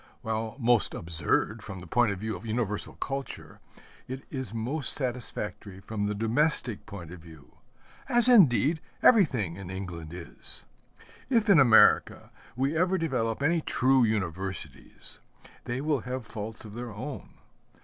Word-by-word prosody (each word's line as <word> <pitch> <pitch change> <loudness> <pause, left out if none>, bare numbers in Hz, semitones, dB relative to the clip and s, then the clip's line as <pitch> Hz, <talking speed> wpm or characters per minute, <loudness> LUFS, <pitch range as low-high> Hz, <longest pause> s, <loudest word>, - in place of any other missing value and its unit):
While 110 0 -3
most 120 -4 +2
absurd 85 -2 0
from 95 - -7
the 90 - -10
point 115 +5 +2
of 100 - -3
view 110 +2 -3
of 90 - -9
universal 110 -2 -2
culture, 135 -2 -5 0.5
it 130 +1 -6
is 130 -7 -4
most 125 +7 -2
satisfactory 120 -6 -4
from 105 +1 -3
the 105 - -2
domestic 120 +1 0
point 90 -6 -8
of 90 - -9
view 80 -4 -16 0.5
as 240 0 +5
indeed 160 - +5 0.2
everything 125 - +4
in 95 -2 -8
England 90 -4 -6
is. 85 -1 -4 0.6
If 225 -5 +3
in 170 - +7
America 120 -5 +5 0.2
we 135 +5 0
ever 180 +3 +2
develop 130 -7 -1
any 165 +2 +2
true 130 -2 +3
universities, 95 -4 -3 0.5
they 125 +2 -3
will 150 -2 +1
have 125 +1 -5
faults 110 +1 -7
of 105 - -10
their 120 +1 -6
own. 130 +7 -7
115 Hz, 145 wpm, -28 LUFS, 100-135 Hz, 0.6 s, in